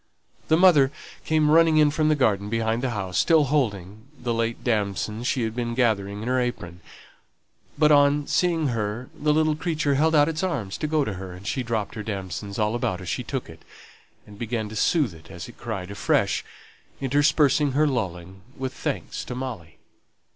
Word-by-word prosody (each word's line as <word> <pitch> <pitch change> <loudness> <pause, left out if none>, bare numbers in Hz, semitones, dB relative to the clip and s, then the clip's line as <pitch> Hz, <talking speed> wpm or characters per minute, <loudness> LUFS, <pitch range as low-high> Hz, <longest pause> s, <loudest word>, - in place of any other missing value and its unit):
The 160 - +4
mother 160 -7 +6 0.3
came 155 -1 +2
running 165 0 +5
in 150 -1 +5
from 155 +1 +1
the 155 - +4
garden 105 -7 +1
behind 115 +1 0
the 130 - -1
house, 95 -6 -2
still 160 -2 +4
holding 110 -6 -2
the 120 -1 -2
late 115 0 -2
damsons 110 0 -1
she 130 -3 0
had 110 0 -3
been 120 -1 -2
gathering 105 -4 0
in - - -5
her 130 0 +2
apron; 90 -8 -4 1.0
but, 150 0 +4
on 145 0 +4
seeing 165 -4 +1
her, 115 +3 -3
the 150 -1 0
little 155 0 +2
creature 155 -3 -1
held 160 +3 +2
out 145 -1 +5
its 160 -1 -2
arms 125 - -3
to 155 - -1
go 150 -2 +1
to 105 - -3
her, 95 -1 -7
and 90 +2 -12
she 130 - -1
dropped 115 -4 -2
her 110 - -5
damsons 100 -1 -5
all 105 -1 +1
about 105 -6 -1
as 95 -2 -7
she 125 - -2
took 130 +1 -4
it, 80 0 -13 0.6
and 105 -1 -14
began 115 -2 -2
to 110 - -8
soothe 135 - +2
it 80 0 -15
as 90 -3 -8
it - - -14
cried 100 -5 -5
afresh, 100 - +1 0.6
interspersing 145 +1 +2
her 150 +3 +3
lulling 95 - -3 0.2
with 130 0 -4
thanks - - -4
to 125 - -6
Molly. 120 -11 -6
120 Hz, 190 wpm, -24 LUFS, 105-150 Hz, 1.0 s, mother